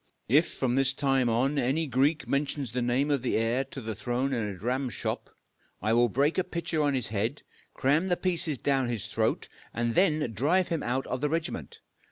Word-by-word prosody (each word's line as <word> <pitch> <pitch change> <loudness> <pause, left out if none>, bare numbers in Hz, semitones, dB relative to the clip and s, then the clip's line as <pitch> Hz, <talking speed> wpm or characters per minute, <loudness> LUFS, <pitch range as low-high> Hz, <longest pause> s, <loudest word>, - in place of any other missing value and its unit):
If, 150 +8 +4
from 125 -2 0
this 135 0 +3
time 135 -3 +1
on, 135 +6 +1
any 135 +6 +1
Greek 140 +4 +1
mentions 140 -3 -1
the 125 +1 -2
name 125 +5 +1
of 140 -3 +1
the 125 - 0
heir 115 +4 +1
to 135 - -8
the 110 -3 -4
throne 125 +5 -2
in 120 - 0
a 95 - -7
dramshop, 125 +5 -2 0.5
I 110 +3 0
will 120 +1 +4
break 140 - +1
a - - +2
pitcher 170 -2 -2
on 145 -2 +2
his 125 -3 -1
head, 110 +7 -2 0.3
cram 150 +7 +2
the 175 -2 +1
pieces 170 -5 0
down 135 -1 +1
his 115 -4 -3
throat, - - -1 0.3
and 115 0 0
then 155 -7 +2
drive 160 - +2
him 165 -2 -1
out 130 +2 -1
of 125 - -4
the 150 - +1
regiment! 165 +1 -3
135 Hz, 205 wpm, -28 LUFS, 120-150 Hz, 0.5 s, If